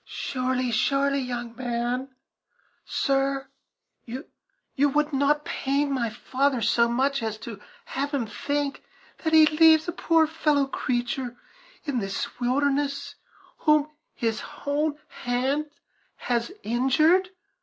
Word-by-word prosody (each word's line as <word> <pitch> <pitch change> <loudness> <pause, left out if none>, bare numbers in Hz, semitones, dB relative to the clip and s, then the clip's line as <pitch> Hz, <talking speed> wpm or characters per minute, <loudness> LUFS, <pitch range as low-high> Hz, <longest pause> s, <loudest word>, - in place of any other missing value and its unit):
"Surely, 255 -1 -2
surely 275 +4 +2
young 240 -2 -4
man 245 +1 -2 0.8
sir 275 0 0 0.6
you 265 +3 -4
would 300 +1 +1
not 290 +2 +2
pain 280 +1 0
my 240 -4 0
father 260 +4 0
so 235 +1 +3
much 270 +3 +1
as 220 -1 -3
to 215 -2 -9 0.2
have 280 +2 -2
him 275 -5 0
think 285 +5 -2 0.4
that 320 - -1
he 315 -1 +8
leaves 315 +1 +5
a 330 -2 +3
fellow 300 -3 +2
creature 245 -1 -2 0.5
in 280 -5 0
this 195 +4 -4
wilderness 280 +3 0 0.4
whom 300 -1 +3 0.2
his 225 -2 -1 0.2
own 295 +1 0
hand 265 +5 -1 0.5
has 240 +5 -1
injured. 305 - +3
275 Hz, 110 wpm, -26 LUFS, 245-290 Hz, 0.8 s, he